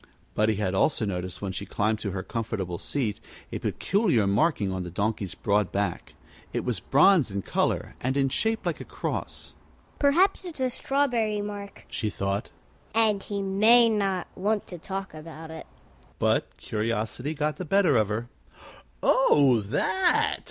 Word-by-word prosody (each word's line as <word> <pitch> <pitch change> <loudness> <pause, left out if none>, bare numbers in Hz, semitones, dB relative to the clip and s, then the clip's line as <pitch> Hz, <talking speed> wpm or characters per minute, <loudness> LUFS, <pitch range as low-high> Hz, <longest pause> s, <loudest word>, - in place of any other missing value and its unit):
Buddie 110 0 +2
had 100 -2 -1
also 110 +4 +2
noticed, 90 -1 -4
when 100 - -2
she 95 - -4
climbed 105 +2 0
to 105 - -3
her 95 0 -4
comfortable 100 -6 -3
seat, 115 -8 -2 0.3
a - - -3
peculiar 190 - +1
marking 100 - +2
on 95 0 -3
the 90 - -5
Donkey's 100 +1 -2
broad 105 -2 +1
back. 100 +1 -2 0.4
It - - -2
was 120 -6 -1
bronze 145 - +4
in 100 -1 -3
color, - - -1
and 130 +2 0
in 135 -1 +2
shape 220 +10 -1
like - - -2
a - - -4
cross. - - -5 0.5
"Perhaps 335 +8 +3
it's 345 -6 -7
a 255 -1 +1
strawberry 240 -7 0
mark," 205 -1 -7
she 110 - -2
thought, 100 +2 -2 0.5
"and 215 -3 +3
he 200 0 -3
may 220 +5 +5
not 195 -4 0
want 205 +2 0
to 175 - -7
talk 195 +2 -5
about 160 +1 -9
it." 160 - -9 0.5
But - - 0
curiosity 115 +6 -2
got 150 +1 -1
the - - -4
better 185 -4 +3
of 110 -3 +3
her. 110 +3 -2 0.8
"Oh, 140 - +5
that?" 375 - +1
140 Hz, 160 wpm, -27 LUFS, -, 0.8 s, may